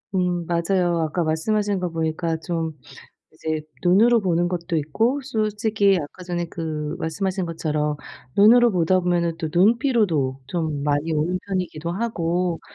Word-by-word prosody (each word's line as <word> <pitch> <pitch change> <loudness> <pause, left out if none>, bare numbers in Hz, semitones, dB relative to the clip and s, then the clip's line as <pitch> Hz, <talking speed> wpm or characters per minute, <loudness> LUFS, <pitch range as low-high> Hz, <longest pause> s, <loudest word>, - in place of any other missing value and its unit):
음 180 -2 0
맞아요. 175 0 +1
아까 160 +2 -1
말씀하시는 200 +6 0
거 180 - -1
보니까 160 0 -1
좀 160 -2 -3 0.5
이제 155 -1 -3 0.2
눈으로 220 +7 +5
보는 175 -2 +1
것도 175 -1 -2
있고 225 - 0
솔직히 215 -4 +1
아까 150 +4 -8
전에 175 -1 -2
그 155 -2 -4
말씀하신 190 +3 -2
것처럼 150 -2 -1 0.4
눈으로 235 +4 +7
보다 185 0 +2
보면은 175 -2 0
또 160 -2 -2
눈 195 +8 +4
피로도 170 - +1
좀 155 -1 -2
많이 145 +2 0
오는 160 +4 0
편이기도 175 -4 -3
하고 180 -4 -1
175 Hz, 310 characters per minute, -23 LUFS, 160-195 Hz, 0.5 s, 눈으로